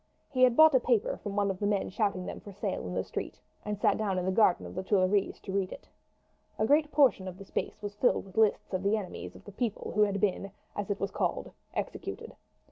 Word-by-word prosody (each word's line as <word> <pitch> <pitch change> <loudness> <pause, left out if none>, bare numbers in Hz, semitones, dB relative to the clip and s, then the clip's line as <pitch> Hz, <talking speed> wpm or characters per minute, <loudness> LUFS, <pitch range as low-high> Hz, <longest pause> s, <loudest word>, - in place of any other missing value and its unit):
He 255 -2 -1
had 250 -2 +6
bought 315 -1 +8
a 260 - +6
paper 240 -3 +1
from 205 -2 -6
one 200 -1 +2
of 185 - -7
the 205 - 0
men 205 -2 0
shouting 200 -2 0
them - - -6
for 205 - -11
sale 195 - -3
in 90 - -5
the 95 - 0
street, - - -6 0.2
and 210 0 -3
sat - - +2
down 200 -3 0
in 180 - -1
the 190 - +1
garden 190 -2 +3
of - - -8
the 185 - -3
Tuileries 195 0 +1
to 195 - -6
read 190 -1 -1
it. - - -10 0.7
A 215 - +2
great 295 +4 +3
portion 260 -10 +4
of 185 -1 -7
the 195 - -10
space 210 - -4
was 205 0 -4
filled 210 +1 +1
with 190 - -15
lists 220 -2 +2
of 185 - 0
the 200 +3 +2
enemies 195 -4 -7
of - - -14
the 205 - -9
people 220 +1 -3
who 210 - +2
had 200 -1 +2
been, 195 0 0 0.3
as 205 -1 -3
it 205 - -1
was 195 - -2
called, - - -2 0.2
executed. - - -5
205 Hz, 250 wpm, -30 LUFS, 190-215 Hz, 0.7 s, bought